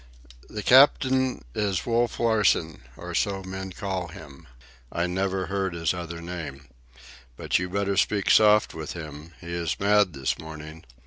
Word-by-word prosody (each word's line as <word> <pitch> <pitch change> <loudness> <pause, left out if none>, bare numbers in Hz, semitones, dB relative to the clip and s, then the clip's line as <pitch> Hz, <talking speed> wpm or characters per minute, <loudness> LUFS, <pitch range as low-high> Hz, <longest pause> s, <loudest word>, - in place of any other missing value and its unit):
"The 105 -1 -6
cap'n 130 - +4
is 100 -1 -1
Wolf 120 0 0
Larsen, 105 - +2 0.2
or - - -7
so 100 -2 0
men 95 0 -6
call 95 -1 -4
him. 70 -5 -13 0.4
I 85 - -1
never 95 +1 -1
heard 95 -2 -2
his 85 0 0
other 85 -1 -6
name. 75 -6 -7 0.7
But - - 0
you 90 0 -3
better 100 +1 -1
speak 100 -1 +2
soft 105 0 +5
with 80 -2 -6
him. 80 -1 -9
He 85 0 -7
is 85 -2 -2
mad 100 -2 +3
this 65 -1 -2
morning. 80 0 -10
95 Hz, 150 wpm, -26 LUFS, 80-100 Hz, 0.7 s, soft